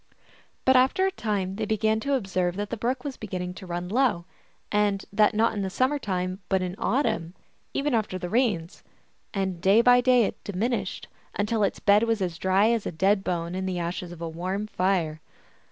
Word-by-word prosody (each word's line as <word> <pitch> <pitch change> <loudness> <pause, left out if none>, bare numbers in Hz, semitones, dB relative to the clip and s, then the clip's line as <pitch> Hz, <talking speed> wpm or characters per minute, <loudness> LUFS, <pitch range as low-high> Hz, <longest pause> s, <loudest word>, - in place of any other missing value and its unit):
But 260 - +5
after 265 +9 +4
a 385 - +1
time 200 - -2
they 220 - -1
began 220 +1 +1
to 280 +4 0
observe 185 -6 -1
that 205 +1 -4
the - - -1
brook 245 +3 -2
was 280 -3 -5
beginning 180 -4 -5
to 185 0 -10
run 175 0 -4
low, 215 -5 +1 0.5
and 205 -2 +1
that 210 +1 +4
not 225 +2 +3
in 205 - -2
the 190 - -2
summer 260 +9 +1
time, 185 -4 -2
but 190 -1 +2
in 180 -1 -3
autumn, 220 - 0 0.4
even 280 0 0
after 215 -5 0
the 180 - -5
rains. 200 -6 0 0.5
And 190 -4 -2
day 195 +5 +5
by 245 +1 +6
day 250 -1 +5
it - - -4
diminished, 205 0 -2 0.3
until 210 +2 0
its 200 - 0
bed 205 +1 +5
was 225 -1 +1
as 175 -3 -3
dry 195 +4 +3
as 230 -3 0
a - - -3
dead 190 +4 +2
bone 170 -2 -2
in 190 +1 -3
the 185 -1 -2
ashes 175 +1 -4
of 170 -1 -10
a - - -2
warm 185 +5 -3
fire. 180 -6 0
200 Hz, 200 wpm, -26 LUFS, 180-230 Hz, 0.5 s, by